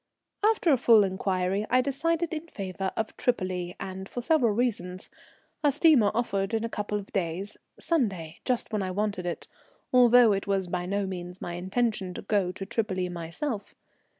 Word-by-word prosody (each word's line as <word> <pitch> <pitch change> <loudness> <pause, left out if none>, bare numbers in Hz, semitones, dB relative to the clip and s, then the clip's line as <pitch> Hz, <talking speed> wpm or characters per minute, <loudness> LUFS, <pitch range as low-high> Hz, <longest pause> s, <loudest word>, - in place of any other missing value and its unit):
After 415 -8 +4
full 230 -3 +6
inquiry 190 +1 -1
I 255 +1 +4
decided 330 +5 0
in 320 +1 -5
favour 195 - -4
of 220 -1 -2
Tripoli, 185 -7 -1
and 190 +1 -6
for - - -5
several 245 -2 +3
reasons. 200 -6 -2 0.5
A 290 - +5
steamer 285 -7 +5
offered 200 -3 0
in 220 - -1
a 230 - -2
couple 210 -1 -2
of 200 -1 -9
days, 190 +2 -2 0.2
Sunday, 195 - -1
just 245 -3 -1
when 210 - +1
I 190 - -2
wanted 200 -1 -2
it, 175 - -4 0.5
although 245 -2 +7
it 195 0 -1
was 195 -1 +1
by 175 0 -3
no 200 +1 0
means 180 -1 -6
my 175 - -5
intention 190 +1 -1
to - - -6
go 200 -4 +1
to 195 +1 -6
Tripoli 190 -4 -1
myself. 180 - -5
200 Hz, 170 wpm, -27 LUFS, 185-240 Hz, 0.5 s, although